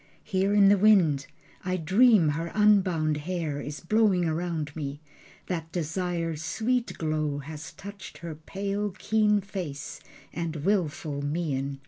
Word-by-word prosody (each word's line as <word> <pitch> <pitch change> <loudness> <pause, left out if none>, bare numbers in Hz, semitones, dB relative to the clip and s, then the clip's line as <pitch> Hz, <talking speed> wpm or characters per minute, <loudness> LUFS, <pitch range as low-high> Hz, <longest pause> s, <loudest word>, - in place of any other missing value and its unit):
Here 195 -1 0
in 200 -1 +7
the 200 -1 +5
wind 175 -10 +4 0.4
I 185 0 -1
dream 190 +1 +5
her 165 +3 -2
unbound 185 -8 +3
hair 155 -2 -3
Is 145 +1 -6
blowing 195 -2 +3
round 160 -2 -2
me, 145 -2 -4 0.5
that 165 -3 -4
desire's 165 -1 -2
sweet 240 +7 -1
glow 155 -2 -1
Has 150 +2 -8
touched 200 0 -10
her 170 -2 -6
pale 200 +6 -3
keen 210 -1 +2
face, 180 -8 -6 0.3
and 165 -1 -3
willful 165 -6 0
mien. 145 -3 -2
170 Hz, 130 wpm, -27 LUFS, 155-200 Hz, 0.5 s, in